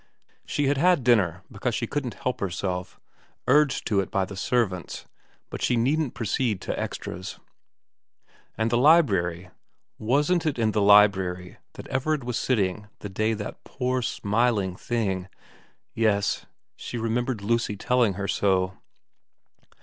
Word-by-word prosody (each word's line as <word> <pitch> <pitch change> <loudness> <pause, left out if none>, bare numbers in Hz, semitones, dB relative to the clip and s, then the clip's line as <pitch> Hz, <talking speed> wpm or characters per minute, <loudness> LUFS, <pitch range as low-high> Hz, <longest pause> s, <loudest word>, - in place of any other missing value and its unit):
She 145 - 0
had 140 +1 +2
had 175 -3 +4
dinner 95 -8 +2
because 115 +2 -2
she 120 - -1
couldn't 130 -1 -3
help 125 -2 -3
herself, 90 -1 -3 0.5
urged 150 -2 +3
to 105 -4 +1
it 95 - -1
by 100 -3 0
the 100 - -9
servants, 95 -3 -1 0.5
but - - -6
she 125 - +2
needn't 135 +4 +1
proceed 115 -2 -1
to - - -3
extras. 90 +1 -5 1.2
And 110 +1 0
the 120 - +3
library, 95 - +3 0.5
wasn't 150 +9 +1
it 150 - -1
in 110 -2 +1
the 105 - 0
library 95 -3 +4 0.2
that - - -10
Everard 140 +2 0
was 120 -1 -2
sitting 105 -4 0
the 105 - -6
day 110 +3 0
that 105 -1 -7
poor 130 -1 -2
smiling 110 -4 0
thing... 95 -4 -2 0.6
yes, 105 -3 +1 0.3
she 120 - -6
remembered 115 0 -1
Lucy 115 -1 0
telling 120 -1 +2
her 100 +2 -3
so. 95 -2 +1
110 Hz, 140 wpm, -25 LUFS, 95-125 Hz, 1.2 s, had